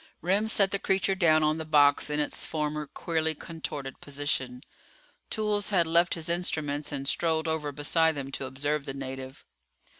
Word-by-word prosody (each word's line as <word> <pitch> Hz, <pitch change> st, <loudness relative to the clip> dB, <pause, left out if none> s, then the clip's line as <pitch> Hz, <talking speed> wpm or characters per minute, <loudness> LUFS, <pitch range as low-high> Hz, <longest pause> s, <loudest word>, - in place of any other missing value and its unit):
Remm 195 Hz, +5 st, +2 dB
set 195 Hz, -3 st, +5 dB
the 200 Hz, -, 0 dB
creature 195 Hz, 0 st, +1 dB
down 160 Hz, -4 st, +4 dB
on 155 Hz, +1 st, +1 dB
the -, -, -3 dB
box 145 Hz, -2 st, +4 dB
in 150 Hz, 0 st, -1 dB
its 150 Hz, -, -1 dB
former 150 Hz, -1 st, -2 dB
queerly 160 Hz, +1 st, -1 dB
contorted 150 Hz, -4 st, -7 dB
position. 140 Hz, -3 st, -2 dB, 0.7 s
Toolls 210 Hz, -2 st, -1 dB
had 180 Hz, -5 st, +3 dB
left 170 Hz, +2 st, +3 dB
his 165 Hz, -2 st, -7 dB
instruments 155 Hz, -4 st, -1 dB
and 140 Hz, -1 st, -3 dB
strolled 160 Hz, +1 st, +1 dB
over 160 Hz, -2 st, -1 dB
beside 160 Hz, +3 st, +2 dB
them 135 Hz, -1 st, -5 dB
to 135 Hz, -, -4 dB
observe 140 Hz, +2 st, -2 dB
the 135 Hz, -, -5 dB
native. 130 Hz, -1 st, -7 dB
155 Hz, 170 wpm, -28 LUFS, 145-170 Hz, 0.7 s, set